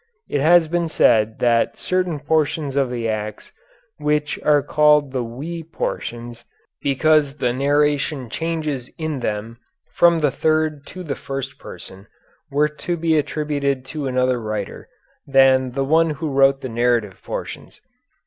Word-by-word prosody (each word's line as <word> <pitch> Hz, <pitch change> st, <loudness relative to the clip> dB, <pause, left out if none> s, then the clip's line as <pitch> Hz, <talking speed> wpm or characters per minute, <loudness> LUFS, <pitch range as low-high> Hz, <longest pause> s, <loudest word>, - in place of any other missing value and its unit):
It 145 Hz, -, -1 dB
has 165 Hz, +2 st, +5 dB
been 170 Hz, +1 st, 0 dB
said 110 Hz, -7 st, +3 dB
that 115 Hz, -1 st, +2 dB
certain 180 Hz, -4 st, -1 dB
portions 150 Hz, -1 st, 0 dB
of 135 Hz, -2 st, +1 dB
the 120 Hz, -2 st, -3 dB
Acts 105 Hz, -1 st, -4 dB, 0.5 s
which 150 Hz, 0 st, 0 dB
are 145 Hz, -2 st, +3 dB
called 150 Hz, -1 st, +3 dB
the 130 Hz, -2 st, -2 dB
"we" 145 Hz, +9 st, -6 dB
portions 120 Hz, -7 st, -5 dB, 0.4 s
because 145 Hz, 0 st, +2 dB
the 120 Hz, -3 st, 0 dB
narration 145 Hz, 0 st, +1 dB
changes 155 Hz, -2 st, -3 dB
in 155 Hz, -4 st, -3 dB
them 110 Hz, 0 st, -4 dB, 0.3 s
from 170 Hz, -1 st, +5 dB
the 145 Hz, -2 st, +2 dB
third 155 Hz, -1 st, 0 dB
to 185 Hz, -, -8 dB
the 150 Hz, -5 st, -3 dB
first 135 Hz, 0 st, -6 dB
person 95 Hz, +2 st, -11 dB, 0.4 s
were 145 Hz, +1 st, +2 dB
to 160 Hz, +3 st, -4 dB
be 165 Hz, -1 st, +1 dB
attributed 145 Hz, -3 st, -1 dB
to 150 Hz, -3 st, -3 dB
another 125 Hz, -1 st, +1 dB
writer 105 Hz, -2 st, -5 dB, 0.4 s
than 130 Hz, -2 st, +4 dB
the 135 Hz, +1 st, -1 dB
one 160 Hz, +3 st, +3 dB
who 155 Hz, 0 st, -3 dB
wrote 135 Hz, 0 st, +4 dB
the -, -, -4 dB
narrative 115 Hz, -4 st, 0 dB
portions. -, -, -7 dB
140 Hz, 145 wpm, -21 LUFS, 125-155 Hz, 0.5 s, has